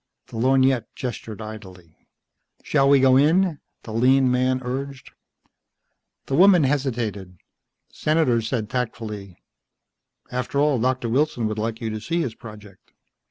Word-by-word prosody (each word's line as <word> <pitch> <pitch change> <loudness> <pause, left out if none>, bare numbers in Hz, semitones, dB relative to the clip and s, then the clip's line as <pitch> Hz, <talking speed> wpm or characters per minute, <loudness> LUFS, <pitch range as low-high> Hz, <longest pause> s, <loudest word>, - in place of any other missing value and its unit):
The - - -8
lorgnette 130 +1 +2
gestured 115 -4 -6
idly. 95 -6 -12 0.6
"Shall 135 0 +2
we 140 -1 +6
go 130 0 +5
in?" 160 +2 +2 0.2
the 110 - -8
lean 130 +3 +3
man 130 +1 +1
urged. 135 +1 -6 1.1
The - - -5
woman 180 +1 +6
hesitated. 115 -9 -2 0.5
Senator 150 -7 +1
said 110 -1 -3
tactfully, 110 -6 -5 0.9
"After 125 +3 -2
all, 145 -3 +2
Doctor 125 0 0
Wilson 125 -1 0
would 110 0 -4
like 115 +1 -3
you 110 -1 -3
to 110 0 -5
see 170 +8 -2
his 125 -8 -3
project." 105 -5 -14
125 Hz, 130 wpm, -23 LUFS, 110-135 Hz, 1.1 s, we